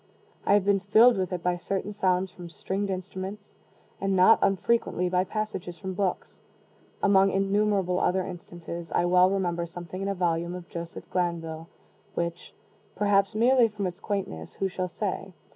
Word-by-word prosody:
I 200 Hz, -, +6 dB
have 205 Hz, -2 st, +2 dB
been 200 Hz, -1 st, +3 dB
filled 220 Hz, +5 st, +6 dB
with 185 Hz, -1 st, -1 dB
it 180 Hz, -2 st, -3 dB
by 180 Hz, 0 st, +1 dB
certain 195 Hz, +3 st, -3 dB
sounds 185 Hz, -2 st, +1 dB
from 175 Hz, -2 st, -10 dB
stringed 195 Hz, +4 st, -3 dB
instruments, 190 Hz, +2 st, -6 dB, 0.5 s
and 195 Hz, 0 st, +1 dB
not 185 Hz, +4 st, +6 dB
unfrequently 195 Hz, -2 st, +1 dB
by 180 Hz, 0 st, +2 dB
passages 195 Hz, -4 st, -4 dB
from 190 Hz, +3 st, -5 dB
books. 185 Hz, -1 st, -2 dB, 0.6 s
Among 195 Hz, -1 st, +5 dB
innumerable 195 Hz, -2 st, +1 dB
other 185 Hz, 0 st, +1 dB
instances, 175 Hz, -1 st, -8 dB
I 175 Hz, -, +2 dB
well 180 Hz, +1 st, +5 dB
remember 175 Hz, -3 st, -1 dB
something 175 Hz, +2 st, -7 dB
in 195 Hz, -, -2 dB
a 200 Hz, -, -1 dB
volume 170 Hz, -1 st, 0 dB
of 180 Hz, -1 st, -8 dB
Joseph 170 Hz, 0 st, -7 dB
Glanvill, 165 Hz, -2 st, -2 dB, 0.5 s
which 170 Hz, +1 st, -3 dB, 0.4 s
(perhaps 200 Hz, -1 st, +2 dB
merely 240 Hz, +2 st, +5 dB
from 210 Hz, -2 st, -4 dB
its 180 Hz, +1 st, -4 dB
quaintness 195 Hz, -, -4 dB
who 195 Hz, -, 0 dB
shall 185 Hz, -1 st, -3 dB
say?) 195 Hz, 0 st, -4 dB
185 Hz, 160 wpm, -27 LUFS, 175-200 Hz, 0.6 s, I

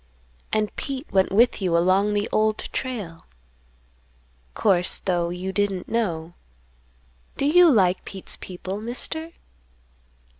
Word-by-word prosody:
And 215 Hz, -1 st, 0 dB
Pete 275 Hz, 0 st, -4 dB
went 190 Hz, -1 st, +2 dB
with 225 Hz, +2 st, +3 dB
you 175 Hz, -3 st, +2 dB
along 190 Hz, +4 st, +3 dB
the 205 Hz, +1 st, 0 dB
Old 215 Hz, 0 st, +2 dB, 0.2 s
Trail. 205 Hz, -11 st, -4 dB, 1.3 s
Course, 180 Hz, -4 st, +2 dB
though, 175 Hz, -3 st, -1 dB
you 180 Hz, +2 st, -4 dB
didn't 195 Hz, -2 st, -1 dB
know. 175 Hz, -8 st, -2 dB, 1.0 s
Do 275 Hz, -, 0 dB
you 345 Hz, +4 st, +6 dB
like 185 Hz, -6 st, +3 dB
Pete's 190 Hz, -1 st, -6 dB
people, 190 Hz, +2 st, -7 dB
Mister?" 320 Hz, +8 st, -4 dB
200 Hz, 115 wpm, -24 LUFS, 180-230 Hz, 1.3 s, you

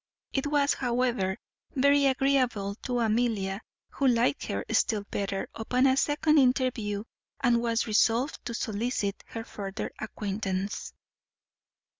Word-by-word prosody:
It 270 Hz, +1 st, 0 dB
was, 290 Hz, -1 st, +3 dB
however, 240 Hz, -6 st, 0 dB, 0.4 s
very 280 Hz, +1 st, +4 dB
agreeable 255 Hz, -7 st, +1 dB
to 245 Hz, -1 st, 0 dB
Amelia, 220 Hz, -3 st, 0 dB, 0.3 s
who 275 Hz, -, +1 dB
liked 245 Hz, +2 st, +2 dB
her -, -, -3 dB
still 215 Hz, -4 st, +2 dB
better 195 Hz, -1 st, -2 dB
upon 250 Hz, +4 st, +1 dB
a 260 Hz, -1 st, +5 dB
second 300 Hz, +2 st, +3 dB
interview, 250 Hz, -6 st, +1 dB, 0.4 s
and 240 Hz, -2 st, +3 dB
was 230 Hz, -1 st, +1 dB
resolved 230 Hz, +5 st, +2 dB
to 235 Hz, -1 st, -3 dB
solicit 215 Hz, -2 st, -2 dB
her 225 Hz, -, -6 dB
further 195 Hz, -3 st, -5 dB
acquaintance. 200 Hz, -2 st, -3 dB
235 Hz, 120 wpm, -28 LUFS, 205-260 Hz, 0.4 s, a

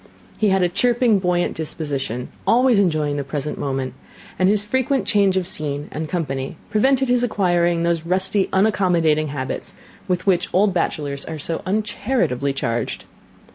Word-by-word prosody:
He 215 Hz, -, +3 dB
had 190 Hz, -1 st, +3 dB
a -, -, +4 dB
chirping, 235 Hz, +3 st, +2 dB
buoyant 180 Hz, -1 st, 0 dB
disposition, 140 Hz, -6 st, -4 dB, 0.2 s
always 245 Hz, -1 st, +4 dB
enjoying 155 Hz, -6 st, +1 dB
the 140 Hz, -, -2 dB
present 145 Hz, +2 st, -4 dB
moment; 135 Hz, -2 st, -2 dB, 0.5 s
and 185 Hz, 0 st, +4 dB
his 205 Hz, 0 st, +4 dB
frequent 260 Hz, +4 st, 0 dB
change 200 Hz, -3 st, +3 dB
of 185 Hz, -, 0 dB
scene 145 Hz, -4 st, -3 dB
and 155 Hz, 0 st, -4 dB
company 135 Hz, -6 st, -3 dB
prevented 265 Hz, +5 st, +3 dB
his 245 Hz, 0 st, +3 dB
acquiring 175 Hz, -7 st, +1 dB
those 170 Hz, -1 st, 0 dB
rusty 190 Hz, +3 st, 0 dB
unaccommodating 180 Hz, -6 st, +2 dB
habits 140 Hz, -2 st, -5 dB, 0.3 s
with 180 Hz, -1 st, -1 dB
which 180 Hz, -3 st, +2 dB
old 195 Hz, +1 st, +3 dB
bachelors 145 Hz, -5 st, -2 dB
are 160 Hz, -, -5 dB
so 160 Hz, +2 st, -3 dB
uncharitably 210 Hz, -, 0 dB
charged. 120 Hz, -4 st, -3 dB
175 Hz, 150 wpm, -21 LUFS, 150-205 Hz, 0.5 s, a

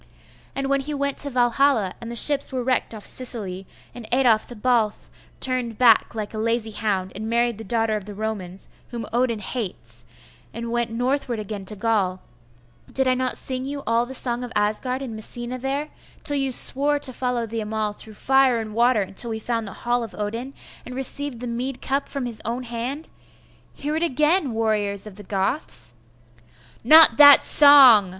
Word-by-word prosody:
And 275 Hz, 0 st, -2 dB
when 275 Hz, 0 st, +1 dB
he 295 Hz, +2 st, -5 dB
went 280 Hz, 0 st, -2 dB
to 285 Hz, -, 0 dB
Valhalla, 245 Hz, -4 st, +1 dB
and 230 Hz, -, -7 dB
the 235 Hz, -, -6 dB
ships 280 Hz, +4 st, +3 dB
were 255 Hz, -2 st, -3 dB
wrecked 250 Hz, -2 st, -1 dB
off 210 Hz, -, -10 dB
Sicily, 200 Hz, -7 st, -4 dB, 0.3 s
and 240 Hz, -3 st, -10 dB
Adolf 240 Hz, -4 st, +2 dB
the 245 Hz, -, -9 dB
Balth 225 Hz, -1 st, -1 dB, 0.3 s
turned 250 Hz, -4 st, -1 dB
back 235 Hz, -2 st, +4 dB
like 215 Hz, -1 st, -5 dB
a 215 Hz, -, -5 dB
lazy 230 Hz, 0 st, -1 dB
hound, 195 Hz, -3 st, -2 dB
and 215 Hz, +3 st, -6 dB
married 235 Hz, -1 st, 0 dB
the -, -, -7 dB
daughter 225 Hz, -2 st, -1 dB
of 210 Hz, -2 st, -5 dB
the 205 Hz, -1 st, -9 dB
Romans, 200 Hz, -4 st, -6 dB, 0.2 s
whom 235 Hz, -2 st, -6 dB
Odin 240 Hz, -1 st, 0 dB
hates, 210 Hz, -1 st, -6 dB, 0.5 s
and 235 Hz, 0 st, -5 dB
went 235 Hz, -1 st, -1 dB
northward 245 Hz, +1 st, -2 dB
again 210 Hz, -2 st, -6 dB
to 210 Hz, -, -4 dB
Gaul, 205 Hz, -4 st, -1 dB, 0.7 s
did 260 Hz, -1 st, +3 dB
not 255 Hz, 0 st, -2 dB
I -, -, -12 dB
sing 255 Hz, -1 st, -3 dB
you 280 Hz, +1 st, -6 dB
all 230 Hz, +1 st, +1 dB
the 265 Hz, -, -6 dB
song 245 Hz, -1 st, 0 dB
of 245 Hz, -, -7 dB
Asgard 215 Hz, +6 st, -1 dB
in 235 Hz, -4 st, -7 dB
Messina 240 Hz, +3 st, -4 dB
there, 275 Hz, +4 st, -3 dB, 0.3 s
till 290 Hz, -1 st, -1 dB
you 270 Hz, -1 st, -1 dB
swore 285 Hz, +3 st, +2 dB
to 270 Hz, -3 st, -7 dB
follow 250 Hz, -2 st, -2 dB
the 225 Hz, 0 st, -5 dB
Amal 215 Hz, 0 st, -3 dB
through 215 Hz, +1 st, -13 dB
fire 265 Hz, 0 st, +2 dB
and 220 Hz, -2 st, -5 dB
water 235 Hz, 0 st, +2 dB
until 195 Hz, +5 st, -2 dB
we 220 Hz, -, -3 dB
found 230 Hz, 0 st, -3 dB
the 195 Hz, -, -8 dB
hall 240 Hz, 0 st, +1 dB
of 225 Hz, -, -9 dB
Odin, 230 Hz, +6 st, -5 dB, 0.3 s
and 250 Hz, -, -9 dB
received 270 Hz, -1 st, -2 dB
the -, -, -5 dB
mead 245 Hz, +2 st, -4 dB
cup 275 Hz, +1 st, -2 dB
from 275 Hz, -3 st, -4 dB
his 230 Hz, -3 st, -6 dB
own 240 Hz, +3 st, -4 dB
hand? 245 Hz, +6 st, -5 dB, 0.7 s
Hear 295 Hz, +2 st, -4 dB
it 320 Hz, -, -2 dB
again, 305 Hz, 0 st, +1 dB
warriors 210 Hz, -3 st, -1 dB
of 210 Hz, -2 st, -11 dB
the -, -, -9 dB
Goths!' 195 Hz, -, -2 dB, 0.9 s
'Not 315 Hz, +6 st, +7 dB
that 285 Hz, -1 st, +9 dB
song! 265 Hz, -9 st, +9 dB
240 Hz, 190 wpm, -22 LUFS, 215-265 Hz, 0.9 s, that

